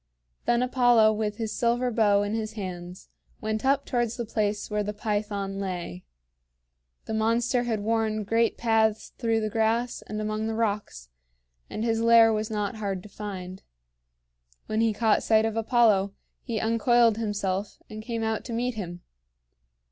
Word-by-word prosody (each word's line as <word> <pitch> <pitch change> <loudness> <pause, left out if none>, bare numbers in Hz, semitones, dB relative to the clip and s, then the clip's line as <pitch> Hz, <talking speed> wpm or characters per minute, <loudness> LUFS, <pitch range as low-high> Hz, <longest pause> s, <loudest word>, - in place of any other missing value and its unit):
Then 240 +1 +2
Apollo 245 -4 +4
with 210 -1 -2
his 220 -2 -3
silver 245 +1 +1
bow 205 -3 +3
in 205 +1 -2
his 220 -1 -3
hands 180 -3 -7 0.3
went 220 0 -2
up 275 +1 +2
towards 240 -3 -1
the 235 - -3
place 210 -1 -2
where 210 0 0
the 210 0 -4
Python 205 -2 -2
lay. 175 - -5 1.0
The - - -4
monster 230 +3 +1
had 220 -3 -1
worn 220 0 0
great 225 +3 +1
paths 220 -2 +1
through 225 -1 +1
the 215 - -1
grass 225 +2 0
and 215 - -4
among 215 +1 -2
the 225 - -2
rocks, 205 - -2 0.6
and 215 - -4
his 225 -1 +1
lair 230 -1 +6
was 215 +1 -2
not 210 -1 -2
hard 195 -3 -3
to 210 - -12
find. 190 -3 -7 1.0
When 215 +1 -1
he 225 -1 +3
caught 215 0 +2
sight 220 0 +3
of 225 -1 -2
Apollo, 220 -4 +3 0.3
he 230 -4 -3
uncoiled 230 0 +3
himself, 205 -2 -2
and 215 0 -8
came 230 0 -3
out 220 -1 -1
to 240 - -5
meet 245 +2 -1
him. 175 -5 -6
220 Hz, 165 wpm, -26 LUFS, 205-230 Hz, 1.0 s, lair